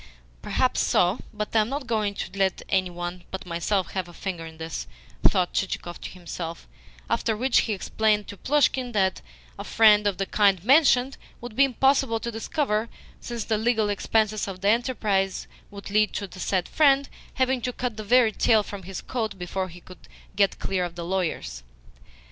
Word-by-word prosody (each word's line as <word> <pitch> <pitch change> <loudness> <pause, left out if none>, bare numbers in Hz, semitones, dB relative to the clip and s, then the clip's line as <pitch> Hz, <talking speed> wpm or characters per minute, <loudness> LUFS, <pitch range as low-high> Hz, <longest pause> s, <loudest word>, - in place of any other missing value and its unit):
"Perhaps - - +1
so, 180 +6 +2
but 210 0 -5
I - - +6
am 215 +1 +1
not 280 0 -3
going 215 -3 -1
to - - -5
let 195 -1 0
any 185 -2 +1
one 175 0 -6
but 190 0 -6
myself 180 +3 -1
have 185 -2 -3
a 175 - -13
finger 175 -4 -5
in 160 0 -12
this," 160 - -5 0.3
thought 180 -2 +3
Chichikov 175 -2 -3
to - - -6
himself; 170 -2 -7 0.4
after 220 -2 0
which 255 +2 +3
he 220 - 0
explained 210 +1 0
to - - -8
Plushkin 260 +1 +1
that 190 -3 +1 0.4
a - - -4
friend 210 -2 +5
of 200 -3 0
the 195 - -1
kind 195 -3 +2
mentioned 265 0 +4 0.2
would 240 -2 -9
be 275 - +6
impossible 265 -2 +2
to 235 - -4
discover, 225 -1 -1 0.3
since 235 -2 -5
the 215 -1 0
legal 220 -2 +1
expenses 215 +1 0
of 185 -2 -7
the 200 - +2
enterprise 210 -5 0 0.2
would 200 -1 -9
lead 215 0 +3
to 200 - -3
the 185 -1 -12
said 185 -1 0
friend 280 -2 +4 0.3
having 260 -1 +1
to 250 +2 -2
cut 245 -2 -3
the 215 - -6
very 235 +1 +4
tail 215 0 +3
from 200 -1 -8
his 190 0 -7
coat 220 -5 -3
before 185 +1 -3
he 175 +1 -13
would 185 - -14 0.3
get 200 -1 +2
clear 190 -2 -1
of 175 -1 -5
the 170 -1 -5
lawyers. 165 - -2
205 Hz, 190 wpm, -25 LUFS, 185-235 Hz, 0.4 s, I